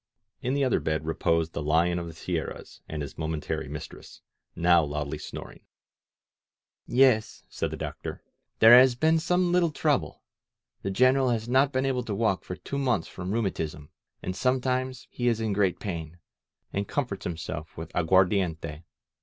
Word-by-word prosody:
In 130 +2 -1
the 140 - +2
other 130 - +2
bed 80 -1 -2
reposed 80 0 0
the - - -3
Lion 85 +4 +2
of 85 - -5
the 85 - -8
Sierras - - -5
and 75 -1 -3
his 70 - -9
momentary 80 -1 -3
mistress, - - -9 0.3
now 85 -1 +4
loudly 75 -1 -3
snoring. - - -8 1.3
^*Yes,'' 125 -4 +3
said - - -3
the - - -6
Doctor, - - -6 0.3
"there 115 +2 +9
has 125 0 +7
been 160 +5 +3
some 180 +1 +1
little 175 -1 +3
trouble. 150 - -1 0.6
The 95 - -3
General 130 +6 +4
has 115 -1 -1
not 135 +3 +3
been 130 0 0
able 130 -2 0
to 105 - -3
walk 105 -4 +1
for 90 - -6
two 140 - -5
months 125 -11 +1
from 95 0 -6
rheumatism.. 95 -9 -2
•. - - -18 0.4
And 90 - -3
sometimes 130 +1 0
he 120 - -2
is 115 -2 +2
in 110 -2 -1
great 95 -3 +1
pain, 85 -4 -5 0.6
and 100 0 -1
comforts 125 -9 -2
himself 80 -2 -5
with 80 +1 -7
aguardiente. 90 -3 +1
100 Hz, 165 wpm, -27 LUFS, 80-130 Hz, 1.3 s, there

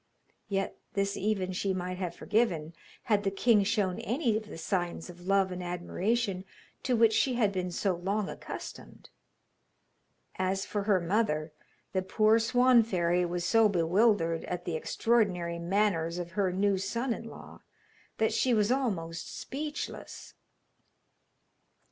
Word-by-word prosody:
Yet 195 -1 -1 0.2
this 200 -1 0
even 195 -3 -1
she 190 +1 -1
might 180 0 -4
have 175 -2 -3
forgiven 170 -9 0 0.3
had 210 -2 +1
the 195 - +2
king 205 +2 +3
shown 200 -3 0
any 240 -1 0
of 215 0 -3
the 210 - -9
signs 175 0 -2
of 175 +1 -14
love 195 -1 +3
and 180 0 -5
admiration 185 +3 -1 0.4
to 255 - +1
which 225 -1 +5
she 255 +3 +2
had 215 -4 +2
been 185 -2 -2
so 185 +2 0
long 195 +4 -1
accustomed. - - -9 1.3
As 190 +1 0
for 205 -1 -3
her 200 -3 +4
mother, 170 -4 0 0.4
the 190 - +1
poor 215 +4 +3
Swan 245 +1 +5
fairy 180 -4 +1
was 175 0 -3
so 225 -2 +5
bewildered 175 -1 +2
at 180 -1 -4
the 170 - -2
extraordinary 180 -3 0
manners 170 -2 +1
of 175 -1 -5
her 190 0 0
new 195 +1 +1
son 230 +6 -1
in 230 - -7
law, 225 - -11 0.6
that 220 - +1
she 250 -2 +2
was 210 +1 +2
almost 180 -11 -2
speechless. 295 +3 -6
195 Hz, 145 wpm, -30 LUFS, 175-220 Hz, 1.3 s, which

